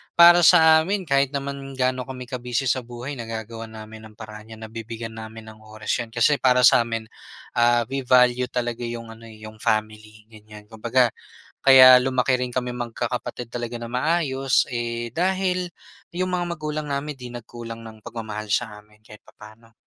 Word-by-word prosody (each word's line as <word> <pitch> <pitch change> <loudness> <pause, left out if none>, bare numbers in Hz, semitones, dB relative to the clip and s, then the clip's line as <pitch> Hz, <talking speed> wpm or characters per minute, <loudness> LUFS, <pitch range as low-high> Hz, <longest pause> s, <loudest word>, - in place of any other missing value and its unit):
para 175 0 +8
sa 160 -2 +7
amin 190 +5 -1
kahit 140 -3 +1
naman 140 -1 -5
gaano 130 -1 -1
kami 130 -1 -7
ka-busy 125 0 -2
sa 130 - 0
buhay, 120 +3 -8
nagagawan 115 0 -7
namin 110 0 -11
ng 110 - -19
paraan 105 0 -11
'yan. 110 - -12
Nabibigyan 115 0 -7
namin 110 0 -10
ng 110 - -17
oras 110 0 -6
'yan. 115 -1 -7
Kasi 140 +5 +3
para 125 -1 +3
sa - - +7
amin, 115 -1 -5 0.5
ah, 120 0 +4
we 135 -2 -4
value 125 0 +4
talaga 120 -1 -3
'yong 115 -1 -7
ano, 115 0 -13
eh, 110 -1 -14
'yong 110 0 -11
family 110 0 -3
ganyan. 105 -1 -14
Kumbaga 115 +3 0 0.6
kaya 130 -1 +9
lumaki 130 0 +1
rin 125 -1 -4
kami 125 -1 -2
magkakapatid 120 0 -5
talaga 120 0 -5
na 115 0 -7
maayos, 135 -1 +1
eh, 120 -1 -3
dahil 185 0 0 0.5
'yong 185 +1 -1
mga 180 -1 -1
magulang 155 0 -4
namin 140 +2 -3
'di 125 -1 -9
nagkulang 115 -1 -9
ng 110 -1 -12
pagmamahal 110 -2 -6
sa 105 +1 -1
amin 105 0 -26
kahit 105 0 -14
papaano. 110 +2 -16
120 Hz, 170 wpm, -23 LUFS, 110-130 Hz, 0.6 s, kaya